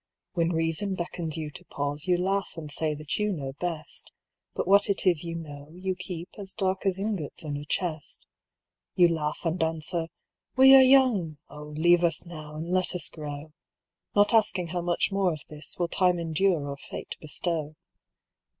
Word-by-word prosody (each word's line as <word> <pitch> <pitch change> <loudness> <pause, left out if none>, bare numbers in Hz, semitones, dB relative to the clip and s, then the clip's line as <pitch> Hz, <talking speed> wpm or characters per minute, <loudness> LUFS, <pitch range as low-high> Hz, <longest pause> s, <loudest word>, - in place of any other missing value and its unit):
"When 170 -2 +1
Reason 165 +3 0
beckons 170 -2 -4
you 155 -2 -4
to - - -9
pause, 145 +2 -3
You 180 -1 +4
laugh 195 +2 0
and 155 -2 -6
say 155 0 -1
that 150 +4 -3
you 210 0 +1
know 135 -7 -4
best; 165 -4 -3 0.4
But - - -1
what 200 +2 +5
it 200 - 0
is 175 -4 +3
you 170 -1 -4
know, 145 -3 -8
you 185 +1 -2
keep 180 -1 -7
As 190 -2 -6
dark 190 -1 0
as 190 -1 +1
ingots 195 -6 -3
in 150 -2 -3
a 145 +1 -5
chest. 160 -1 -3 0.7
"You 175 -1 +6
laugh 155 0 -2
and 165 +2 0
answer, 165 +1 -1 0.5
'We 265 +1 +9
are 265 - +10
young; 255 - +4
O 150 +1 -9
leave 170 +4 +3
us 165 0 +1
now, 155 -3 -9
and 165 +3 -5
let 185 0 +1
us 180 - 0
grow.' 150 0 -7 0.6
Not 205 +2 +4
asking 190 -6 +3
how 175 +1 -2
much 175 +3 +1
more 195 -3 +2
of 155 - -7
this 150 -1 -6
Will 175 - +1
Time 180 0 +2
endure 165 -1 +1
or 140 0 -5
Fate - - -7
bestow. 155 0 -2
170 Hz, 185 wpm, -27 LUFS, 155-185 Hz, 0.7 s, are